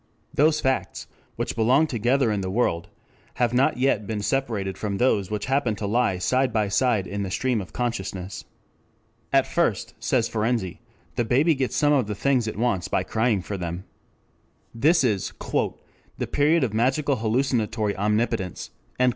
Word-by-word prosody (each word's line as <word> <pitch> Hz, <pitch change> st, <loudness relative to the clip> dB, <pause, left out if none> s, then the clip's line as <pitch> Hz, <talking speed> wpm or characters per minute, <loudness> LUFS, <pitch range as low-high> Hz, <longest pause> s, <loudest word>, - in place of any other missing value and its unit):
Those 155 Hz, +1 st, +3 dB
facts 130 Hz, -2 st, -1 dB, 0.3 s
which -, -, -3 dB
belong 125 Hz, +7 st, +4 dB
together 125 Hz, -1 st, +1 dB
in 105 Hz, -2 st, -1 dB
the 95 Hz, -, -3 dB
world 90 Hz, -5 st, 0 dB, 0.5 s
have 120 Hz, -1 st, +1 dB
not 135 Hz, +4 st, +3 dB
yet 125 Hz, -6 st, +1 dB
been 105 Hz, -2 st, -3 dB
separated 110 Hz, -7 st, -1 dB
from 100 Hz, 0 st, -3 dB
those 100 Hz, -6 st, +2 dB
which 105 Hz, -1 st, -3 dB
happen 130 Hz, -4 st, +1 dB
to 105 Hz, -, -5 dB
lie 110 Hz, -2 st, +1 dB
side 125 Hz, +9 st, +1 dB
by 110 Hz, -2 st, 0 dB
side 110 Hz, -2 st, +2 dB
in 100 Hz, +2 st, -4 dB
the 100 Hz, -, -3 dB
stream 125 Hz, +3 st, 0 dB
of 90 Hz, -5 st, -10 dB
consciousness. 95 Hz, -4 st, -4 dB, 0.9 s
At 135 Hz, -1 st, +4 dB
first, 165 Hz, -, 0 dB
says 120 Hz, -3 st, +1 dB
Ferenczi, 110 Hz, -4 st, -1 dB, 0.4 s
the 120 Hz, -, +2 dB
baby 135 Hz, +8 st, +3 dB
gets 135 Hz, -3 st, -2 dB
some 150 Hz, 0 st, +3 dB
of 130 Hz, -7 st, +2 dB
the 105 Hz, -, -3 dB
things 125 Hz, +1 st, +1 dB
it 110 Hz, -, -4 dB
wants 115 Hz, -6 st, 0 dB
by -, -, 0 dB
crying 110 Hz, -4 st, 0 dB
for 100 Hz, -, -4 dB
them. 85 Hz, 0 st, -4 dB, 0.9 s
This 150 Hz, +7 st, +3 dB
is 105 Hz, -6 st, 0 dB, 0.8 s
"the -, -, -2 dB
period 150 Hz, +2 st, +3 dB
of 115 Hz, -5 st, -1 dB
magical 135 Hz, +5 st, +1 dB
hallucinatory 115 Hz, -2 st, 0 dB
omnipotence." 105 Hz, -2 st, -1 dB
115 Hz, 165 wpm, -24 LUFS, 100-130 Hz, 0.9 s, belong